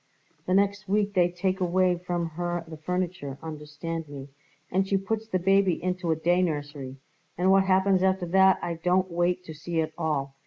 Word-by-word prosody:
The 185 - +2
next 200 +1 +1
week 205 0 +1
they 175 -2 +3
take 185 +2 -1
away 180 0 +2
from 175 -1 -3
her 175 +1 -3
the 160 - -8
furniture, 175 -4 -3
understand 155 +1 -6
me, 140 -1 -8 0.4
and 190 +2 +1
she 195 - +2
puts 220 +3 -3
the 185 - 0
baby 195 0 +3
into 180 -1 -2
a 160 - +3
day 175 +3 +2
nursery, 145 -5 -3 0.4
and 185 +2 +3
what 195 0 +5
happens 190 0 +3
after 190 -1 +2
that 190 +2 +5
I 175 - -1
didn't 185 +1 +2
wait 175 +1 0
to 160 - -8
see 165 +2 -3
at 160 0 -1
all. 145 -4 -1
180 Hz, 190 wpm, -27 LUFS, 160-190 Hz, 0.4 s, what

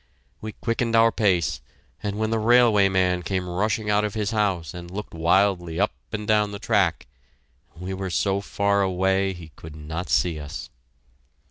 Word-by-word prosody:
We 110 0 -6
quickened 115 0 -1
our 115 0 +5
pace, 90 -9 +1 0.4
and 105 -1 -3
when 110 0 -1
the 115 - +1
railway 110 -3 +5
man 90 -1 +1
came 90 +1 -2
rushing 105 +4 -1
out 105 +1 +2
of 105 0 -3
his 105 -1 -1
house 95 -8 -1
and 85 0 -8
looked 105 +4 -7
wildly 85 0 +1
up 105 - +2 0.2
and 105 -1 -4
down 105 -1 +2
the 100 - -5
track, 100 -5 +1 0.7
we 90 +1 -5
were 95 0 -4
so 100 +2 0
far 100 0 0
away 95 +1 +1
he 85 -3 -11
could 80 -1 -11
not 80 +4 -6
see 85 -3 +1
us! 75 +1 -8
100 Hz, 170 wpm, -24 LUFS, 90-105 Hz, 0.7 s, our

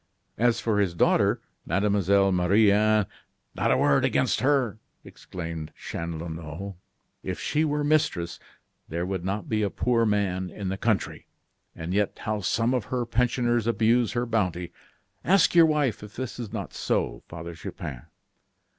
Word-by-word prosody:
As 120 0 +3
for 110 -3 0
his 95 -4 +1
daughter, - - +3 0.2
Mademoiselle 100 +1 +2
Marie 95 +4 +4
Anne 105 0 +3 0.3
" - - -48
"Not - - 0
a - - +4
word - - +3
against - - +2
her!" 130 -6 +1 0.2
exclaimed 80 -3 -7
Chanlouineau; 85 +3 -6 0.5
"if 90 -3 -4
she 150 - 0
were 150 -1 0
mistress, 145 - +1 0.5
there 85 +2 -2
would 95 -2 -3
not 95 +3 -3
be 110 -1 0
a 100 - +1
poor 115 +3 +1
man 95 -3 0
in 100 +1 -5
the 95 - -1
country; 110 -3 -1 0.5
and 80 +2 -4
yet, 105 0 0
how 105 0 -2
some 115 +6 +1
of 125 -5 0
her 125 +2 -2
pensioners 120 -1 +1
abuse 115 0 +2
her 120 0 0
bounty. 90 -7 -1 0.5
Ask 190 +6 +4
your 170 -2 +7
wife 150 -7 +1
if 105 0 -11
this 130 -1 -5
is 115 -5 -5
not - - -5
so, - - -1
Father 85 +1 -7
Chupin." 80 -6 -7
105 Hz, 155 wpm, -26 LUFS, 90-120 Hz, 0.5 s, your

